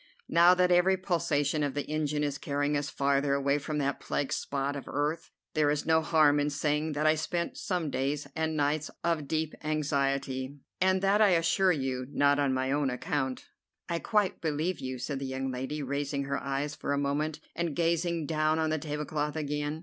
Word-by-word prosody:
Now 175 Hz, +2 st, +6 dB
that 180 Hz, 0 st, +3 dB
every 180 Hz, +2 st, +4 dB
pulsation 155 Hz, -5 st, 0 dB
of 145 Hz, -2 st, -1 dB
the 145 Hz, -, -2 dB
engine 150 Hz, -1 st, -1 dB
is 145 Hz, -1 st, -2 dB
carrying 145 Hz, +1 st, -1 dB
us 145 Hz, -1 st, -1 dB
farther 140 Hz, +1 st, +1 dB
away 140 Hz, +1 st, +1 dB
from 150 Hz, +1 st, -4 dB
that 140 Hz, -1 st, -1 dB
plague 140 Hz, -, -2 dB
spot 140 Hz, 0 st, -2 dB
of 140 Hz, -, -6 dB
earth, 145 Hz, +4 st, -2 dB, 0.2 s
there 150 Hz, -2 st, +3 dB
is 145 Hz, 0 st, 0 dB
no 160 Hz, 0 st, +4 dB
harm 155 Hz, -2 st, +4 dB
in 145 Hz, 0 st, +1 dB
saying 150 Hz, +1 st, 0 dB
that 150 Hz, +1 st, -1 dB
I 155 Hz, -, +6 dB
spent 170 Hz, +2 st, -2 dB
some 175 Hz, -6 st, -2 dB
days 140 Hz, +3 st, -1 dB
and 160 Hz, -1 st, -1 dB
nights 145 Hz, +1 st, 0 dB
of 165 Hz, -4 st, 0 dB
deep 160 Hz, 0 st, -1 dB
anxiety, 140 Hz, -3 st, -1 dB, 0.2 s
and 190 Hz, 0 st, +2 dB
that, 200 Hz, +2 st, +4 dB
I 195 Hz, -5 st, +6 dB
assure 185 Hz, +3 st, +3 dB
you, 130 Hz, -5 st, -2 dB
not 145 Hz, 0 st, +3 dB
on 140 Hz, -2 st, +2 dB
my 130 Hz, 0 st, 0 dB
own 145 Hz, -1 st, +1 dB
account." 130 Hz, +1 st, -2 dB, 0.4 s
"I 170 Hz, -1 st, -1 dB
quite 210 Hz, -1 st, 0 dB
believe 160 Hz, +3 st, -1 dB
you," 130 Hz, -1 st, -4 dB
said 135 Hz, +2 st, -4 dB
the 135 Hz, -, -4 dB
young 130 Hz, 0 st, -3 dB
lady, 135 Hz, +4 st, -4 dB
raising 140 Hz, +1 st, -2 dB
her 140 Hz, 0 st, -2 dB
eyes 140 Hz, +2 st, -2 dB
for 145 Hz, -, -3 dB
a -, -, 0 dB
moment, 145 Hz, +2 st, -1 dB, 0.2 s
and 170 Hz, -4 st, -2 dB
gazing 170 Hz, -1 st, 0 dB
down 155 Hz, 0 st, +1 dB
on 160 Hz, -1 st, +1 dB
the 155 Hz, -, 0 dB
tablecloth 150 Hz, 0 st, -3 dB
again. 150 Hz, 0 st, -2 dB
150 Hz, 195 wpm, -29 LUFS, 140-160 Hz, 0.4 s, Now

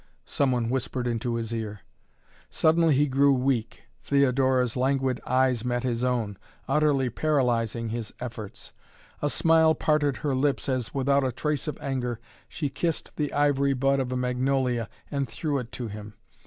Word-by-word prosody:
some 140 Hz, -2 st, +1 dB
one 120 Hz, -2 st, 0 dB
whispered 125 Hz, 0 st, -2 dB
into 120 Hz, 0 st, -1 dB
his 115 Hz, 0 st, -3 dB
ear. 105 Hz, -3 st, -4 dB, 0.7 s
Suddenly 160 Hz, -1 st, +3 dB
he 145 Hz, +2 st, +4 dB
grew 140 Hz, +1 st, +3 dB
weak. 125 Hz, -3 st, -1 dB, 0.2 s
Theodora's 130 Hz, -3 st, +2 dB
languid 130 Hz, -1 st, 0 dB
eyes 130 Hz, -2 st, +2 dB
met 120 Hz, 0 st, -1 dB
his 120 Hz, -1 st, -1 dB
own, 115 Hz, -6 st, -1 dB, 0.3 s
utterly 135 Hz, -3 st, +2 dB
paralyzing 120 Hz, -5 st, 0 dB
his 115 Hz, -1 st, -4 dB
efforts. 115 Hz, -5 st, -7 dB, 0.5 s
A 145 Hz, -, +1 dB
smile 160 Hz, 0 st, +4 dB
parted 150 Hz, -4 st, +1 dB
her 140 Hz, +4 st, -1 dB
lips 135 Hz, +2 st, 0 dB
as, 130 Hz, -4 st, -1 dB
without 140 Hz, +1 st, +2 dB
a 130 Hz, -, 0 dB
trace 150 Hz, -2 st, -2 dB
of 150 Hz, -, -3 dB
anger, 125 Hz, -4 st, -3 dB, 0.3 s
she 150 Hz, -, -2 dB
kissed 160 Hz, +4 st, -3 dB
the 150 Hz, -2 st, -1 dB
ivory 140 Hz, -1 st, +2 dB
bud 135 Hz, +1 st, +2 dB
of 130 Hz, -1 st, -2 dB
a 130 Hz, -, -1 dB
magnolia 125 Hz, -2 st, 0 dB, 0.2 s
and 140 Hz, -2 st, -1 dB
threw 145 Hz, -4 st, -2 dB
it 125 Hz, -2 st, -7 dB
to 120 Hz, -, -4 dB
him. 105 Hz, 0 st, -9 dB
130 Hz, 160 wpm, -26 LUFS, 120-140 Hz, 0.7 s, he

